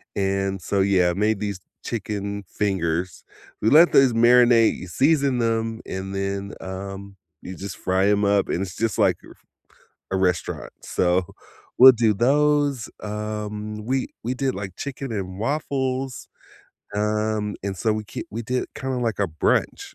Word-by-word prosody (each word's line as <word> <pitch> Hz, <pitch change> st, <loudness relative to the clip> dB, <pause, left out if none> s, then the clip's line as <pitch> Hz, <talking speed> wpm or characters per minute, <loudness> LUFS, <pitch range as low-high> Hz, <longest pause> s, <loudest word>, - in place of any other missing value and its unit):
and 95 Hz, -1 st, -1 dB
so, 100 Hz, +3 st, 0 dB
yeah, 90 Hz, -3 st, +3 dB
made 105 Hz, +2 st, +1 dB
these 100 Hz, -3 st, -3 dB, 0.3 s
chicken 100 Hz, -2 st, -4 dB
fingers. 90 Hz, -3 st, -2 dB, 0.4 s
We 110 Hz, -, +3 dB
let 165 Hz, +6 st, +7 dB
those 135 Hz, -2 st, +6 dB
marinate, 120 Hz, 0 st, +5 dB
you 90 Hz, -, -8 dB
season 135 Hz, -, +2 dB
them, 115 Hz, -1 st, -1 dB
and 95 Hz, +1 st, -5 dB
then, 100 Hz, 0 st, -3 dB
um, 95 Hz, +1 st, -7 dB, 0.3 s
you 95 Hz, -, -8 dB
just 95 Hz, -1 st, -7 dB
fry 95 Hz, +1 st, +1 dB
'em 105 Hz, 0 st, +2 dB
up 100 Hz, -1 st, +2 dB
and 90 Hz, -, -1 dB
it's 95 Hz, -2 st, -5 dB
just 115 Hz, -2 st, -1 dB
like -, -, +3 dB
re -, -, -14 dB, 0.8 s
a -, -, +2 dB
restaurant. 90 Hz, -2 st, -1 dB
so, 90 Hz, 0 st, +1 dB, 0.5 s
we'll 130 Hz, +1 st, +11 dB
do 115 Hz, -2 st, +2 dB
those, 145 Hz, +2 st, +2 dB
um, 105 Hz, 0 st, -5 dB
we 130 Hz, +1 st, 0 dB, 0.2 s
we 125 Hz, -, -1 dB
did, 130 Hz, 0 st, -1 dB
like, 95 Hz, -2 st, -6 dB
chicken 135 Hz, -2 st, -5 dB
and 95 Hz, -3 st, -4 dB
waffles, 130 Hz, -1 st, -2 dB, 0.7 s
um, 105 Hz, 0 st, -1 dB
and 100 Hz, -1 st, -3 dB
so, 110 Hz, +5 st, +1 dB
we 110 Hz, 0 st, -4 dB
k -, -, -6 dB
we 115 Hz, +3 st, -4 dB
did 125 Hz, +2 st, -1 dB
it -, -, -16 dB
kinda 130 Hz, -1 st, -3 dB
like 115 Hz, -4 st, -1 dB
a 100 Hz, -, +2 dB
brunch, 80 Hz, -1 st, -1 dB
105 Hz, 160 wpm, -23 LUFS, 95-120 Hz, 0.8 s, we'll